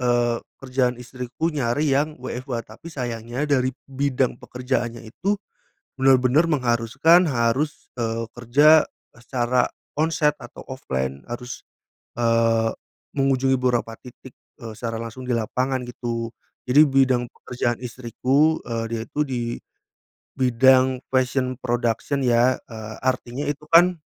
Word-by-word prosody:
eee, 120 -1 +2 0.2
kerjaan 130 -2 0
istriku 125 +6 -4
nyari 145 +2 0
yang 150 +3 +1
WFH, 125 -2 -5
tapi 110 +9 -14
sayangnya 120 -1 -4
dari 130 -3 +1
bidang 135 -2 -1
pekerjaannya 125 -2 -3
itu 195 - -2 0.6
benar-benar 135 +4 +4
mengharuskan 135 +6 +3
harus, 135 +5 0
eee, 115 -1 -2
kerja 145 +6 +5 0.3
secara 120 0 0 0.3
on 160 +1 +3
site 150 -2 +2
atau 120 - -11
offline 65 - -4
harus, 125 +1 -6 0.6
eee, 115 -1 +3 0.5
mengunjungi 135 -1 +2
beberapa 120 -3 0
titik, 125 +1 -14 0.3
eee, 115 -2 -7
secara 115 -1 -4
langsung 115 +3 -7
di 125 - -1
lapangan 130 +3 -1
gitu 115 -1 -4 0.4
jadi 150 +4 +7
bidang 130 -3 +3
pekerjaan 120 -1 -3
istriku, 130 +6 +1
eee, 115 -1 -3
dia 115 - -2
itu 150 - -6
di 125 -3 -3 0.9
bidang 130 0 +3
fashion 130 0 0
production 120 +3 -1
ya, 120 +1 +4
eee, 110 -1 -8
artinya 130 +1 -1
itu 150 +1 -4
kan, 175 0 +5
125 Hz, 120 wpm, -23 LUFS, 120-135 Hz, 0.9 s, jadi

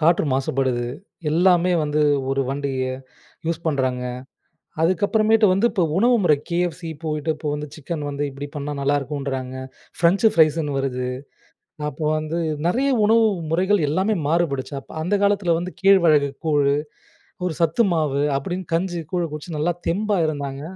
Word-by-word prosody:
காற்று 165 +1 +3
மாசுபடுது. 130 -2 0 0.4
எல்லாமே 180 +2 +4
வந்து 150 0 0 0.3
ஒரு 135 0 +1
வண்டிய 135 -2 -2 0.6
யூஸ் 165 0 -2
பண்றாங்க. 130 -4 0 0.8
அதுக்கப்புறமேட்டு 215 +5 +3
வந்து 195 +5 +2
இப்போ 190 -5 +1
உணவு 240 +4 +4
முறை 155 -4 +5
KFC 175 +1 -1 0.2
போயிட்டு, 155 0 -2
இப்போ 150 0 -6
வந்து 150 0 -4
சிக்கன் 155 +1 -5
வந்து 145 0 -3
இப்படி 140 +1 -7
பண்ணா 145 0 -4
நல்லாருக்குன்றாங்க. 135 -2 -2 0.4
ஃப்ரெஞ்ச் 180 +6 +3
ஃப்ரைஸுன்னு 155 -3 +3
வருது. 125 -2 -2 0.8
அப்போ 150 +2 -5
வந்து, 155 +2 -3 0.3
நிறைய 260 +10 +1 0.2
உணவு 225 +1 +5 0.2
முறைகள் 185 0 +2
எல்லாமே 190 +8 +1
மாறுபடுச்சு. 150 -4 0
அப்ப 135 - -17
அந்த 180 +5 -1
காலத்துல 200 -4 +2
வந்து 180 +1 -5
கேழ்வரகு 170 -7 +5 0.2
கூழு, 145 -2 +3 0.7
ஒரு 175 - -2
சத்து 165 +7 +3
மாவு, 150 -4 +1 0.2
அப்படின்னு 180 +4 -5
கஞ்சி, 175 0 -1
கூழ 180 -1 +1
குடிச்சி, 155 +3 -7
நல்லா 170 +4 +1
தெம்பா 205 +3 0
இருந்தாங்க. 140 -2 -4
160 Hz, 140 wpm, -22 LUFS, 140-180 Hz, 0.8 s, முறை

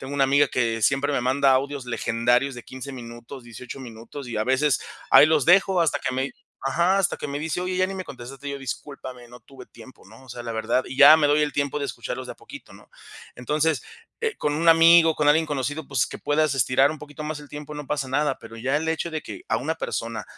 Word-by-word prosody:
Tengo 135 +1 -7
una 140 -1 +2
amiga 140 +1 +3
que 115 -2 -1
siempre 135 +7 +2
me 135 - 0
manda 135 +2 +3
audios 135 0 -1
legendarios 120 +3 0
de 120 - -9
15 130 +1 -8
minutos, 120 0 -10
18 120 +3 -9
minutos, 125 +2 -9
y 115 -3 -5
a 110 - +1
veces, 130 +3 +2 0.3
ahí - - +8
los 155 -3 +2
dejo 185 +1 +4
hasta 150 -3 +1
que 130 - -2
me 130 +1 -2 0.3
ajá, 170 +8 +2
hasta 195 - +1
que - - -6
me 140 0 -3
dice: 160 +3 -3
"Oye, 185 0 -2
ya 185 0 +2
ni 195 - -6
me 190 - -4
contestaste". 135 +2 -9
Y - - -3
yo: 140 - -5
"Discúlpame, 130 -2 -8
no 120 +1 -13
tuve 130 -2 -14
tiempo", 130 - -16
¿no?, 115 +6 -16
o - - -19
sea, 120 0 -7
la 120 - -6
verdad. 110 +3 0
Y 130 - -7
ya 155 - +9
me 150 -2 +2
doy 150 +1 +3
el 150 - -1
tiempo 140 +1 -1
de 145 - -3
escucharlos 135 - -5
de - - -6
a - - -17
poquito, - - -13
¿no? - - -17 0.5
Entonces, 150 +3 0 0.4
eh, 455 -2 -1
con 145 0 -1
un 165 +2 +1
amigo, 165 0 +7
con 150 -1 +1
alguien 160 +2 +4
conocido, 145 +1 -3
pues, 130 -4 +1
que - - -9
puedas 150 -1 +1
estirar 130 +2 +3
un 155 - -7
poquito 150 0 -10
más 150 0 -4
el 145 - -13
tiempo, 150 0 -8
no 145 -2 -7
pasa 140 -3 -2
nada, 145 +3 0
pero 115 - -11
ya 130 +5 -1
el 160 +1 -4
hecho 160 +1 -2
de 155 - -3
que 355 - -9
a - - +1
una - - -3
persona, - - -4
140 Hz, 250 wpm, -24 LUFS, 130-155 Hz, 0.5 s, ya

